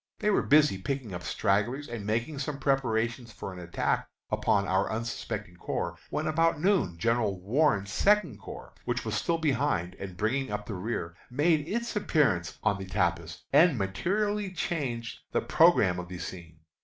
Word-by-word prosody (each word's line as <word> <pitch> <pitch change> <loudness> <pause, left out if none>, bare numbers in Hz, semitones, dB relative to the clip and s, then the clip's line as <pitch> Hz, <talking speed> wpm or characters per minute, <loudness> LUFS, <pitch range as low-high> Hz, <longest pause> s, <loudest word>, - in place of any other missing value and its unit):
They 210 -1 +1
were - - +3
busy 145 -8 +4
picking 130 -2 -3
up 90 - -5
stragglers 105 - 0
and 120 -3 -5
making 115 +7 -1
some 145 0 -3
preparation 120 -3 0
for 105 -3 -7
an 90 - -9
attack 85 -1 -1 0.2
upon 100 0 +2
our 95 +1 +1
unsuspecting 110 -5 -4
corps, 85 0 -3
when 150 - -2
about 165 0 +2
noon 175 - +2
General 110 -1 +1
Warren's 100 -1 +1
Second 210 - +3
Corps, - - -10
which - - -2
was - - -2
still 170 -1 +1
behind, 135 - 0
and 95 -2 -7
bringing 125 +5 0
up 105 0 -3
the 110 - -5
rear, 90 -3 -3 0.2
made 150 +3 +2
its 235 +5 -2
appearance 140 - +1
on 100 -2 +2
the 95 - -5
tapis, 85 -3 -1
and 160 -1 +6
materially 200 - -1
changed 135 -10 -3
the - - +2
programme 90 -1 +4
of 90 - -6
the 90 0 -7
scene. 85 -3 -8
115 Hz, 165 wpm, -29 LUFS, 95-150 Hz, 0.2 s, and